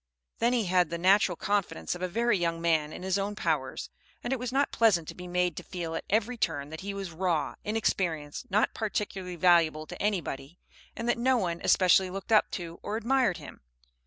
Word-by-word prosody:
Then 235 +2 +2
he 235 -4 +1
had 180 -2 +2
the 170 - -3
natural 185 +1 +4
confidence 200 +2 -1
of 175 - -8
a 185 - 0
very 230 +4 +1
young 170 -2 -1
man 160 -3 +1
in 180 - -8
his 190 +1 0
own 205 +1 -2
powers, - - -2 0.3
and 245 - -1
it 265 - -2
was 250 0 -3
not 275 +2 +1
pleasant 190 -9 +3
to - - -6
be 180 0 -9
made 180 -1 0
to - - -5
feel 170 -3 -5
at 165 - -4
every 225 +4 +1
turn 150 -7 -2
that 160 - -7
he 200 +1 -4
was 195 -3 -5
raw, 165 -2 -1
inexperienced, 175 -8 -1
not 210 +3 +2
particularly 195 -4 -3
valuable 165 -3 +3
to 180 - -9
anybody, 170 -7 -2 0.4
and 230 - -4
that 240 - +1
no 255 +1 +3
one 175 -6 -2
especially 185 0 +4
looked 195 +4 -7
up 215 - +5
to 170 -2 -6
or 210 - -3
admired 235 -5 +2
him. - - -11
185 Hz, 210 wpm, -29 LUFS, 170-210 Hz, 0.4 s, up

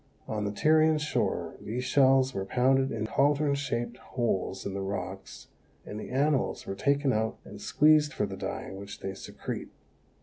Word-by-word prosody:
On 105 -1 -2
the 100 - -1
Tyrian 155 +6 +4
shore 150 0 -1
these 120 +4 -3
shells 130 0 +4
were 95 - -2
pounded 130 +5 +2
in 110 -1 -2
caldron 145 +4 +2
shaped 120 -4 -2
holes 95 -7 -2
in 100 - -3
the 100 - -3
rocks, 95 +1 -6 0.4
and 105 - -6
the - - -7
animals 140 +1 +1
were - - -3
taken 140 +6 +1
out 110 +1 0
and - - -10
squeezed 150 0 +4
for 105 - -1
the 100 -1 -6
dye - - -5
which 100 +1 -8
they 95 - -4
secrete. 95 - -6
125 Hz, 170 wpm, -29 LUFS, 105-140 Hz, 0.4 s, Tyrian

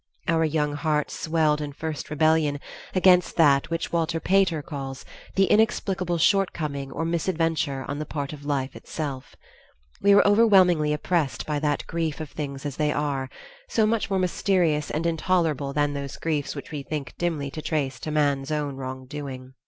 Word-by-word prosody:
Our 165 -1 +3
young 150 -1 0
hearts 150 0 -1
swelled 155 -2 +1
in 145 -1 -5
first 155 -1 -5
rebellion 150 -1 +2 0.4
against 180 -1 +4
that 140 -4 +4
which 165 0 -2
Walter 165 0 0
Pater 185 -4 +2
calls 135 -3 -6 0.3
"the 195 - +5
inexplicable 190 -4 +1
shortcoming 155 -7 +1
or 165 - -3
misadventure 165 -5 0
on 140 +1 -4
the 155 - -3
part 145 -1 -4
of 145 -1 -10
life 140 -2 -2
itself"; 140 -5 -6 0.7
we 200 0 +6
were 200 - +6
overwhelmingly 190 -8 +5
oppressed 150 -6 -1
by 150 -1 -1
that 145 -1 -1
grief 165 -2 -2
of 155 -2 -6
things 140 -2 -5
as 145 -2 -4
they 150 -1 +1
are, 140 -3 -1 0.4
so 220 - +3
much 220 0 0
more 195 - +1
mysterious 175 -4 +1
and 160 +2 -2
intolerable 165 -4 +1
than 145 0 +1
those 140 -1 -5
griefs 150 -3 -2
which - - -8
we 150 -2 -4
think 145 -1 -5
dimly 155 -5 -1
to 155 - -6
trace 140 -5 -2
to - - -5
man's 145 -2 +1
own 145 -3 -2
wrongdoing. 130 0 -7
150 Hz, 170 wpm, -25 LUFS, 140-165 Hz, 0.7 s, we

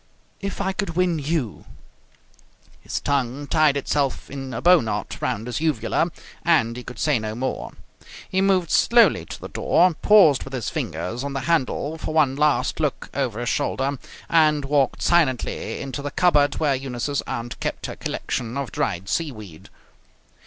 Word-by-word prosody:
"If 200 0 -5
I 190 -1 -1
could 190 -4 -3
win 180 -2 +1
you 145 -6 -2 0.6
" - - -31
His - - -3
tongue 140 0 -1
tied 150 -1 +3
itself 140 -1 -1
in 135 -1 -6
a - - -4
bow 180 0 +6
knot 105 -2 -4
round 115 -4 -2
his 125 +4 -3
uvula, 155 0 +1 0.3
and 115 -9 +2
he 125 - -7
could 125 - -9
say 150 -6 +2
no 110 0 -4
more. 130 +3 -3 0.5
He 190 - 0
moved 190 -4 +2
slowly 235 0 +4
to - - -8
the - - -7
door, 180 0 +3
paused 160 -5 +5
with 135 - -10
his 125 -4 -3
fingers 120 +8 -3
on 140 0 -4
the 135 - -2
handle 155 +1 0
for 155 - -4
one 145 -4 +3
last 145 -3 +1
look 150 -4 -2
over 125 -5 -2
his 120 - -1
shoulder, 135 0 -1 0.3
and 155 -3 +3
walked 140 -2 +1
silently 150 -8 +1
into 135 +1 -5
the 145 - -3
cupboard 145 -2 +3
where 150 -3 +1
Eunice's 135 +1 -2
aunt 120 -2 -5
kept - - -3
her - - -5
collection 120 +1 -4
of 140 -5 -3
dried 90 +3 -2
seaweed. 110 - -4
140 Hz, 170 wpm, -23 LUFS, 125-160 Hz, 0.6 s, bow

